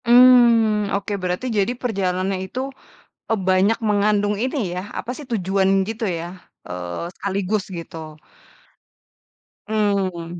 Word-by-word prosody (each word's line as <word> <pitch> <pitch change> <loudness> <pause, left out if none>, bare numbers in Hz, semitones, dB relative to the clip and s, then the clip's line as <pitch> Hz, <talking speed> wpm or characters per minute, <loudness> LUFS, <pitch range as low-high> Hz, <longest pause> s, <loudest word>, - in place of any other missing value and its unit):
Mmm, 235 -4 +6
oke 200 +1 -4
berarti 180 +6 -2
jadi 200 +4 +2
perjalanan 190 -5 -1
itu, 190 +7 -5 0.7
eee, 225 - +2
banyak 190 +4 +3
mengandung 205 0 +2
ini 255 - -2
ya 180 +1 -3 0.2
apa 240 - -5
sih 290 -4 -10
tujuan 195 -3 +1 0.2
gitu 225 +1 -3
ya, 170 -2 -3 0.4
eee, 90 - -5
sekaligus 200 +1 -1
gitu, 165 -1 -7 1.7
mmm. 190 -5 -1
200 Hz, 115 wpm, -22 LUFS, 185-225 Hz, 1.7 s, Mmm